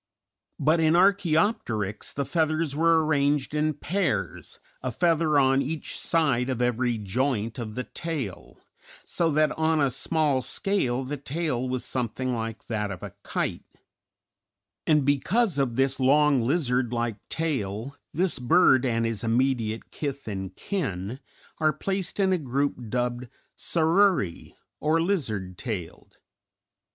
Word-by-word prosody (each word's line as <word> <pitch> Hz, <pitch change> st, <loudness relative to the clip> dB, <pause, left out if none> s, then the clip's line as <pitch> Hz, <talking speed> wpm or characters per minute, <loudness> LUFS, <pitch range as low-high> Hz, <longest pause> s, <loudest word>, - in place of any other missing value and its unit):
But 160 Hz, +2 st, +3 dB
in 160 Hz, 0 st, +4 dB
Archæopteryx 170 Hz, -, +1 dB
the 140 Hz, -, -2 dB
feathers 155 Hz, 0 st, 0 dB
were 165 Hz, 0 st, +4 dB
arranged 145 Hz, -2 st, +1 dB
in 150 Hz, 0 st, +1 dB
pairs, 170 Hz, -, -2 dB, 0.2 s
a 130 Hz, -, -2 dB
feather 165 Hz, +1 st, +2 dB
on 135 Hz, 0 st, +4 dB
each 150 Hz, +3 st, -4 dB
side 140 Hz, -7 st, +1 dB
of 130 Hz, -2 st, -2 dB
every 125 Hz, -1 st, +1 dB
joint 115 Hz, +2 st, -1 dB
of 110 Hz, -2 st, -5 dB
the 125 Hz, -, -2 dB
tail, 145 Hz, -, -5 dB, 0.5 s
so 170 Hz, -1 st, 0 dB
that 155 Hz, 0 st, +3 dB
on 160 Hz, 0 st, +2 dB
a 140 Hz, -3 st, +2 dB
small 150 Hz, -1 st, +1 dB
scale 130 Hz, -3 st, 0 dB
the 145 Hz, +3 st, -4 dB
tail 135 Hz, -3 st, -2 dB
was 130 Hz, -1 st, -2 dB
something 130 Hz, +1 st, -2 dB
like 115 Hz, -1 st, -4 dB
that 105 Hz, -3 st, -2 dB
of 95 Hz, -3 st, -7 dB
a -, -, -7 dB
kite; -, -, -2 dB, 1.2 s
and 150 Hz, -3 st, +4 dB
because 165 Hz, -, +2 dB
of 130 Hz, -4 st, 0 dB
this 135 Hz, +1 st, +1 dB
long, 140 Hz, 0 st, +4 dB
lizard 125 Hz, -2 st, +1 dB
like 115 Hz, -3 st, -1 dB
tail 130 Hz, -5 st, -2 dB, 0.2 s
this 175 Hz, -3 st, 0 dB
bird 130 Hz, -1 st, +4 dB
and 115 Hz, -1 st, 0 dB
his 115 Hz, -2 st, -2 dB
immediate 115 Hz, -1 st, 0 dB
kith 140 Hz, -3 st, -5 dB
and 95 Hz, -2 st, -5 dB
kin 110 Hz, -, -3 dB, 0.4 s
are 155 Hz, -1 st, +3 dB
placed 190 Hz, +4 st, -3 dB
in 190 Hz, -1 st, +3 dB
a 180 Hz, -, +1 dB
group 135 Hz, -3 st, -2 dB
dubbed 125 Hz, +1 st, -2 dB, 0.3 s
Saururæ, 165 Hz, -, +1 dB, 0.2 s
or 155 Hz, +2 st, +2 dB
lizard 110 Hz, -, -2 dB
tailed. 100 Hz, -9 st, -6 dB
135 Hz, 135 wpm, -26 LUFS, 120-160 Hz, 1.2 s, in